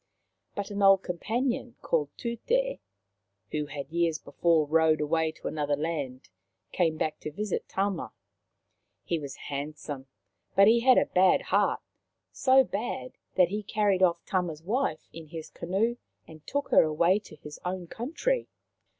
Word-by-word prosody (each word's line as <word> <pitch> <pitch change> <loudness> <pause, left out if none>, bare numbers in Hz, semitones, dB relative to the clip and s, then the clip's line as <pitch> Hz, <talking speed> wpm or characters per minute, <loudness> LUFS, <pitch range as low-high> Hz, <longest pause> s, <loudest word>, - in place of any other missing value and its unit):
But 200 0 -4
an 200 0 -3
old 195 -1 +6
companion 235 +7 -2
called 150 -3 +1
Tute, - - -1 0.7
who 150 -1 -2
had 140 0 -7
years 170 -1 +1
before 165 -1 +1
rowed 160 +1 +3
away 160 +1 +1
to - - -7
another 145 -2 0
land, 145 -6 -4 0.4
came 165 -3 +1
back 155 0 -2
to - - -5
visit 205 +6 -3
Tama. 190 - -1 0.9
He 170 - -1
was 140 -2 -7
handsome, 145 -1 -6 0.5
but 195 +2 +7
he 230 +2 +6
had 255 +1 +5
a - - +5
bad 185 0 +4
heart - - +1 0.3
— - - -56 0.2
so 265 +1 +8
bad 240 +3 -4 0.2
that 180 -2 +5
he 210 +2 -2
carried 205 -2 +1
off 170 -2 +3
Tama's 170 -4 -2
wife 215 - -1
in 165 -1 -9
his 160 0 -8
canoe 205 +8 -1 0.3
and 155 -1 -14
took 285 0 -2
her - - +7
away 170 +5 +3
to 205 - -14
his 150 0 -11
own 180 0 -3
country. 325 - -2
170 Hz, 155 wpm, -28 LUFS, 155-210 Hz, 0.9 s, so